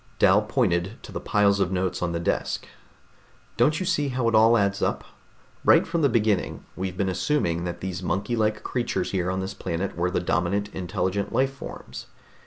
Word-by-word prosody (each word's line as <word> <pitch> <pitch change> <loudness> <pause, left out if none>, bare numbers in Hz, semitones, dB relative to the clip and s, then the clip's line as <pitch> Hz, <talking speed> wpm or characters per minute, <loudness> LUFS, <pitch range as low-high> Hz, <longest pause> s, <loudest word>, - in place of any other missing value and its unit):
Dal 100 +3 +5
pointed 105 -3 0
to - - -10
the - - -4
piles 100 -1 +2
of 95 -2 +1
notes 90 -1 -1
on 90 -1 0
the 85 - -2
desk. 85 - -1 0.9
"Don't 150 +6 +3
you 185 - -2
see 170 -6 +1
how 125 -3 -1
it 115 +1 +5
adds 100 0 0
up? - - 0 0.6
Right - - +6
from 165 0 -1
the 140 - +4
beginning 110 -5 0
we've 95 0 -4
been 100 - 0
assuming 90 - 0
that 85 0 -5
these 95 0 -4
monkey 100 +6 -1
like 110 -1 0
creatures 125 -2 -2
here 90 -2 0
on 95 +1 -1
this 95 +1 -4
planet 95 0 -3
were 90 +1 0
the 90 - 0
dominant, 90 +5 0
intelligent 95 +2 -2
life 135 +1 +1
forms. 135 - -9
100 Hz, 190 wpm, -25 LUFS, 90-115 Hz, 0.9 s, Right